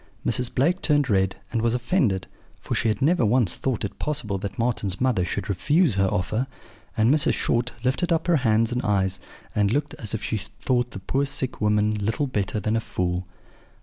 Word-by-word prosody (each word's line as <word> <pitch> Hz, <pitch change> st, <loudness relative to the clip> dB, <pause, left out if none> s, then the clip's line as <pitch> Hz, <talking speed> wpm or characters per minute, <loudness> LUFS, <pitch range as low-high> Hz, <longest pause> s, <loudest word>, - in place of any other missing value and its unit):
"Mrs. 120 Hz, +2 st, +1 dB
Blake 170 Hz, +8 st, +2 dB
turned 145 Hz, -5 st, +2 dB
red, 95 Hz, -1 st, +2 dB, 0.2 s
and 115 Hz, -, 0 dB
was 115 Hz, +1 st, +2 dB
offended; 120 Hz, -, +1 dB, 0.3 s
for -, -, -4 dB
she -, -, +1 dB
had 110 Hz, +5 st, 0 dB
never 165 Hz, -1 st, +3 dB
once 115 Hz, -3 st, +3 dB
thought 130 Hz, -6 st, -2 dB
it 100 Hz, -, -7 dB
possible 125 Hz, -10 st, -2 dB
that 100 Hz, +4 st, -5 dB
Marten's 110 Hz, -5 st, -1 dB
mother 125 Hz, -8 st, +2 dB
should 90 Hz, -, -3 dB
refuse 145 Hz, -, +2 dB
her 95 Hz, 0 st, +2 dB
offer; 110 Hz, +8 st, -1 dB, 0.5 s
and 110 Hz, +5 st, +4 dB
Mrs. 155 Hz, -, +3 dB
Short 120 Hz, +1 st, 0 dB
lifted 135 Hz, +8 st, 0 dB
up 165 Hz, -, +1 dB
her 175 Hz, -2 st, +3 dB
hands 115 Hz, -3 st, +2 dB
and 125 Hz, +1 st, 0 dB
eyes, 100 Hz, -3 st, 0 dB, 0.3 s
and 105 Hz, -1 st, +2 dB
looked 145 Hz, +6 st, -1 dB
as 110 Hz, 0 st, -2 dB
if 110 Hz, -, -5 dB
she 110 Hz, -, -1 dB, 0.2 s
thought 125 Hz, -1 st, 0 dB
the 100 Hz, -, -8 dB
poor 135 Hz, +8 st, 0 dB
sick 135 Hz, -4 st, -2 dB
woman 105 Hz, 0 st, +2 dB
little 110 Hz, +7 st, -1 dB
better 105 Hz, -5 st, -2 dB
than 110 Hz, +2 st, 0 dB
a -, -, +2 dB
fool. 90 Hz, -2 st, -2 dB
115 Hz, 200 wpm, -24 LUFS, 100-135 Hz, 0.5 s, and